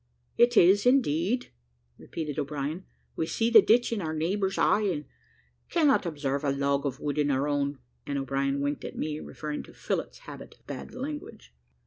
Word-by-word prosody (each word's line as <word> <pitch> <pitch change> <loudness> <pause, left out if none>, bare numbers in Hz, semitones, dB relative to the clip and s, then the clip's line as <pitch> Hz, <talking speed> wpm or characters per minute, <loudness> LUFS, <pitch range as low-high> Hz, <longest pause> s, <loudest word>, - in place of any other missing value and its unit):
"It 240 -1 +4
is, 195 +6 +6
indeed," 240 - +2 0.5
repeated 155 -3 -5
O'Brien; 150 +4 -3 0.3
"we 160 - -1
see 230 +5 0
the 235 - +10
ditch 235 +1 +3
in 215 - -2
our 160 -2 -3
neighbour's 190 +5 -1
eye, 215 - +3
and 175 -8 -1 0.6
cannot 295 - +3
observe 145 -3 -2
the 140 - 0
log 140 +1 0
of 135 0 -5
wood 145 0 -2
in 145 -1 +2
our 140 +1 +1
own;" 145 -1 -1 0.3
and 140 - -2
O'Brien 135 +1 -1
winked 145 +1 -2
at - - -7
me, 150 0 -3
referring 150 -1 -5
to - - -14
Phillott's - - -3
habit - - -10
of - - -35
bad - - -8
language. 295 +4 -7
155 Hz, 175 wpm, -28 LUFS, 140-205 Hz, 0.6 s, the